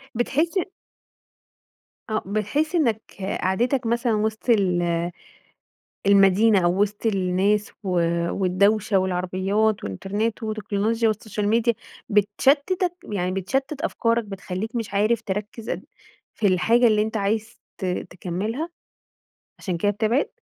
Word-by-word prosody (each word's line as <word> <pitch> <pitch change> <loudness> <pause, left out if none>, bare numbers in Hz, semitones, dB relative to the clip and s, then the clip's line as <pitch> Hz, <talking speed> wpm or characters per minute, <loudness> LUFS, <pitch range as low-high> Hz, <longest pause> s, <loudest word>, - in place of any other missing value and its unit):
بتحس 305 - 0 1.5
آه، 215 - -1
بتحس 215 - -1
إنك 230 -10 +2 0.4
قعدتك 240 +7 +1
مثلًا 235 0 +1
وسط 220 +3 -2
ال 175 -5 +2 1.0
المدينة 200 0 +5
أو 175 +3 +2
وسط 210 +2 -2
الناس 195 +1 +1
و - - -3 0.4
والدوشة 200 +2 +2
والعربيات 190 +3 0
والإنترنت 205 - -2
وتكنولوجيا 215 +1 0
والsocial 210 0 -5
media 235 0 +3 0.4
بتشتتَك 280 - +2 0.2
يعني 180 -2 -1
بتشتت 265 +10 -2
أفكارك 230 0 +1
بتخلّيك 200 +3 -5
مش 220 -3 -4
عارف 215 +3 +2
تركز 210 +2 -5
أد - - -3 0.5
في 215 - 0
الحاجة 230 +6 +4
اللي 215 -2 +4
أنتَ 220 +1 -2
عايز 220 +3 -2 0.2
ت 190 - -5
تكملها، 185 - -3 0.9
عشان 180 -4 -3
كده 205 +4 +2
بتبعد؟ 220 +6 +1
210 Hz, 110 wpm, -24 LUFS, 195-230 Hz, 1.5 s, المدينة